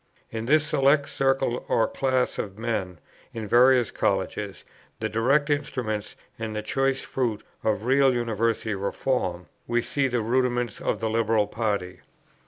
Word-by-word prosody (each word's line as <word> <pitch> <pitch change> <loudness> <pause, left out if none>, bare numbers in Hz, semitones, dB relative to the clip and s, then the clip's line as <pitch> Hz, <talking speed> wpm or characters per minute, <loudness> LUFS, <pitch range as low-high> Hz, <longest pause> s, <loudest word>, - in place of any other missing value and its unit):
In 115 0 -4
this 155 +2 +4
select 140 0 +3
circle 135 -2 0
or 115 - +3
class 130 -1 0
of 100 -1 -4
men, 110 -6 -2 0.4
in 110 -2 -4
various 125 +1 +5
Colleges, - - -2 0.4
the 110 - -2
direct 135 +7 +2
instruments 110 -7 -2 0.2
and 110 -1 -4
the 105 - -3
choice 135 +4 0
fruit 115 -5 -2 0.2
of 105 0 0
real 135 +1 +4
University 115 -2 0
Reform, 95 -2 -2 0.2
we 120 0 +1
see 140 -2 0
the 125 -2 0
rudiments 120 0 0
of - - -1
the 110 - 0
Liberal 110 -1 +2
party. 100 -5 -2
115 Hz, 145 wpm, -26 LUFS, 110-130 Hz, 0.4 s, various